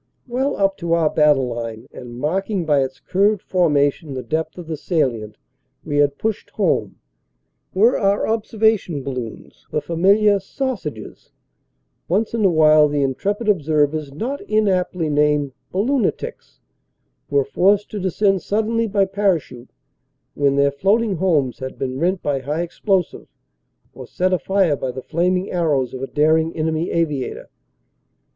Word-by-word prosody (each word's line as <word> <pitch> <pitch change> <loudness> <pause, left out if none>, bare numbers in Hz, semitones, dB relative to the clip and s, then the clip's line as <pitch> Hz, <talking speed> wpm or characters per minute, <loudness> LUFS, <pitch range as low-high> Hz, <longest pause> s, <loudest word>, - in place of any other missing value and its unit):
Well 260 +3 -1
up 195 -1 +1
to 170 -2 -1
our 165 -2 +2
battle 150 -4 +3
line, 115 -2 -5
and 120 -1 -9
marking 185 - -1
by 145 -3 +3
its 130 0 -6
curved 200 +1 +1
formation 150 -4 +1
the 130 - -4
depth 160 +1 -3
of 175 - -8
the 160 0 -4
salient 120 - -2 0.5
we 145 - -2
had 145 -1 +2
pushed 220 -2 -3
home, - - 0 0.8
were 225 +6 +4
our 200 -1 +1
observation 220 -8 0
balloons 125 -5 -7
the - - -1
fam 165 +2 -5
iliar 200 +1 +4
"sausages"; 190 - -5 0.7
once 210 +7 0
in 230 -2 0
a 195 - +5
while 155 -2 +5
the 145 -1 0
intrepid 200 - -2
observers 155 -5 +1
not 245 - -4
inaptly 185 -5 +1
named 150 -2 +1 0.2
"balloonitics" 265 - -2 0.7
were 425 0 +2
forced 205 - +2
to 210 - -4
descend 190 +1 +1
sud 215 +2 0
denly 230 -1 -1
by 200 -1 +3
parachute, 185 -11 -1 0.6
when 140 -1 +1
their 140 0 +3
floating 195 +7 +1
homes 155 -8 +1
had 130 0 -6
been 130 0 -3
rent 180 +3 0
by 145 -2 0
high 150 +6 -2
explosive 185 +1 -1 0.7
or - - -10
set 185 +1 0
afire 185 -3 +2
by 130 - -4
the 130 0 -8
flaming 180 +3 0
arrows 145 -8 0
of 130 - -6
a 135 - -3
daring 160 +3 +2
enemy 160 +1 -1
aviator. 150 -6 -2
165 Hz, 150 wpm, -20 LUFS, 145-200 Hz, 0.8 s, a